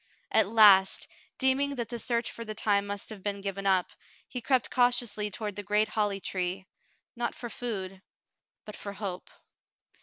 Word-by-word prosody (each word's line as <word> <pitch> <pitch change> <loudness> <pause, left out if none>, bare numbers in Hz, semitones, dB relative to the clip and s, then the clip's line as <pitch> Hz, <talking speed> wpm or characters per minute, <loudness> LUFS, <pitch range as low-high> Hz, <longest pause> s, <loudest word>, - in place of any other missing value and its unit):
At 220 -3 +4
last, 205 -4 +6 0.3
deeming 275 +2 +2
that 235 -3 -3
the 235 - -4
search 235 0 -1
for 230 - -7
the 215 -1 -5
time 205 -1 +1
must 200 0 -4
have 215 -3 -8
been 200 0 -3
given 195 0 -3
up, 185 -2 +2 0.4
he 250 - -5
crept 255 0 +1
cautiously 240 -4 +2
toward 205 0 -5
the 205 - -4
great 210 +2 +1
holly 205 -2 0
tree, 185 0 -3 0.5
not 240 0 -2
for 240 -2 -7
food, 195 -6 -5 0.6
but 210 - -8
for 200 - -7
hope. 195 -3 -6
210 Hz, 170 wpm, -29 LUFS, 195-235 Hz, 0.6 s, last